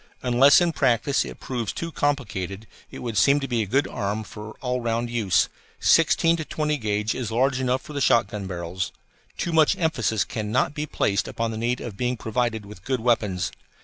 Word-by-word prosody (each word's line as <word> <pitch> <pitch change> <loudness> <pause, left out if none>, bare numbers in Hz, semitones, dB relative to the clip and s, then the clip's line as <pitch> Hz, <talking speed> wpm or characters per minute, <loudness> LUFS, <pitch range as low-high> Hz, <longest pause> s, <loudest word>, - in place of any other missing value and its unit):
Unless 130 +6 +6
in 175 -1 +2
practice 135 -2 +2
it - - -9
proves 120 -5 -3
too 165 0 -5
complicated, 110 - -2 0.2
it - - -9
would 115 -4 0
seem 140 +7 +5
to 135 - -4
be 120 -3 0
a 105 - -2
good 135 +8 +2
arm 105 +2 -3
for 105 +1 -9
all 125 -1 -2
round 115 0 -1
use 110 -6 +2 0.3
sixteen 165 +1 +4
to 160 - -3
twenty 150 0 -1
gauge 105 0 0
is 120 -4 -4
large 130 +3 +2
enough 130 0 0
for 150 - -10
the 140 - -2
shotgun 105 -5 +2
barrels. 85 -2 -4 0.5
Too 170 - -2
much 160 -2 +4
emphasis 115 - +1
cannot 110 +7 -1
be 150 0 -3
placed 100 -7 0
upon 115 0 -2
the 110 - -5
need 120 +2 -1
of 105 -5 -7
being 125 +1 -1
provided 110 -1 -1
with 100 -3 -12
good 130 +1 -1
weapons. 105 -6 +1
120 Hz, 195 wpm, -24 LUFS, 105-135 Hz, 0.5 s, Unless